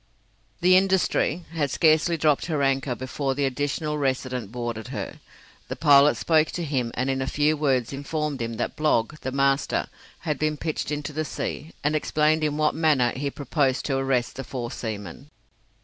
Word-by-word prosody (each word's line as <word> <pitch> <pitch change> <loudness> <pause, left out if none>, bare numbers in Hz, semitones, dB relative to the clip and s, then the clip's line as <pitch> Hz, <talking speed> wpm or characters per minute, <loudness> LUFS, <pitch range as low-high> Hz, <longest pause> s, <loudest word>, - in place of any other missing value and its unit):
The 180 +1 +6
'Industry' 185 -2 +2
had 150 -4 0
scarcely 160 +3 +3
dropped 150 -1 +2
her 150 -4 0
anchor 135 -1 +1
before 135 +1 -3
the 140 0 +1
Additional 145 +3 -2
Resident 130 -5 -2
boarded 120 -2 -4
her. - - -6 0.5
The - - -4
pilot 145 -2 +5
spoke 155 -1 +3
to 175 - -3
him 135 -6 -1
and 130 - -1
in 135 0 0
a 130 - -2
few 150 +2 +2
words 135 -5 0
informed 145 0 -3
him 115 0 -3
that 120 - -3
Blogg, 155 -1 +1
the 130 - -4
master, 135 +1 +1 0.4
had 150 -4 -2
been 155 0 0
pitched 155 +1 -3
into 150 0 -4
the 155 +2 -1
sea, 155 +1 -5
and 150 +1 +1
explained 155 +1 +2
in 150 -1 0
what 155 0 +2
manner 150 -7 +2
he 140 +2 -2
proposed 140 -2 0
to 135 -2 0
arrest 135 -3 0
the 135 - -4
four 120 -2 -5
seamen. 110 - -6
145 Hz, 180 wpm, -25 LUFS, 130-155 Hz, 0.5 s, The